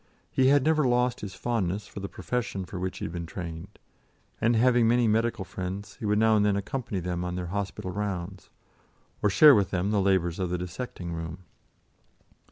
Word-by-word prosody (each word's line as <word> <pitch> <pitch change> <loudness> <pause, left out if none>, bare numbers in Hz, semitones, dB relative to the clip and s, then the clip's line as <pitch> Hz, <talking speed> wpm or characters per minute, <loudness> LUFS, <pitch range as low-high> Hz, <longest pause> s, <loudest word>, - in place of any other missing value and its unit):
He 130 - +3
had 140 0 +5
never 155 0 +3
lost 125 0 +1
his 95 -2 -6
fondness 105 -4 -1
for - - -9
the 100 0 -5
profession 115 -6 -3
for 90 0 -7
which 95 +1 -3
he - - -4
had - - -5
been 85 -1 -5
trained, 85 +3 -7 0.6
and 115 +1 +3
having 120 0 +4
many 120 0 +3
medical 110 -2 +1
friends, 95 +3 -6
he 110 - -4
would 105 0 +2
now 110 0 +4
and 105 - +3
then 105 -1 +2
accompany 100 0 -3
them 90 0 -3
on 90 0 -3
their 90 -1 -3
hospital 100 -2 -3
rounds, 95 -2 -4 0.7
or 105 - +3
share 150 +8 +8
with 100 -5 +3
them 95 +2 -1
the 105 -2 +2
labours 95 -3 +1
of 90 -2 -1
the 90 - -1
dissecting 90 -1 -6
room. 80 +2 -6
100 Hz, 195 wpm, -27 LUFS, 90-115 Hz, 0.7 s, share